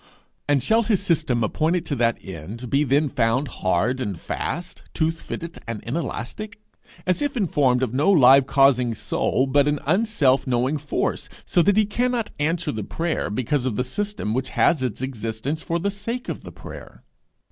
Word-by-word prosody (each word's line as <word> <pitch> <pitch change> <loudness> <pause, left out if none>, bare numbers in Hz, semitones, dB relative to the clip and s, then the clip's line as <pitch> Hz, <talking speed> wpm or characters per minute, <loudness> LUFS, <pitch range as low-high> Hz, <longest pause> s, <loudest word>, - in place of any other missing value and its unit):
and 145 -3 +3
shall 225 +1 +3
his 215 -4 +1
system 160 - +1
appointed 160 - 0
to 145 - -2
that 115 -2 +1
end 95 +8 -7
be 140 +2 +3
then 145 +2 +2
found 125 +1 +1
hard 105 +9 +1
and 100 -8 -3
fast, 175 +2 -4
tooth 165 0 0
fitted 170 +1 -6
and 115 -2 -4
inelastic, 170 - -4 0.5
as 185 +6 +1
if 285 -3 -1
informed 140 - +2
of 125 -2 -2
no 145 +9 +3
live 135 -5 +7
causing 130 -4 +3
soul, 130 - 0
but 140 +2 +3
an 150 0 +2
unself 185 - +2
knowing 130 +4 +1
force 145 0 -2 0.2
so 175 - +3
that 205 +3 +3
he 215 - +5
cannot 240 +2 -1
answer 165 +3 0
the 110 -1 -4
prayer 165 - -2
because 130 +5 -1
of 120 - -1
the 125 - 0
system 205 - -3
which 130 +2 -1
has 165 -6 +2
its 125 -1 -2
existence 125 +4 -3
for 170 - -1
the 200 +4 -1
sake 230 +5 -5
of - - -4
the - - -10
prayer? - - -11
140 Hz, 180 wpm, -23 LUFS, 125-175 Hz, 0.5 s, live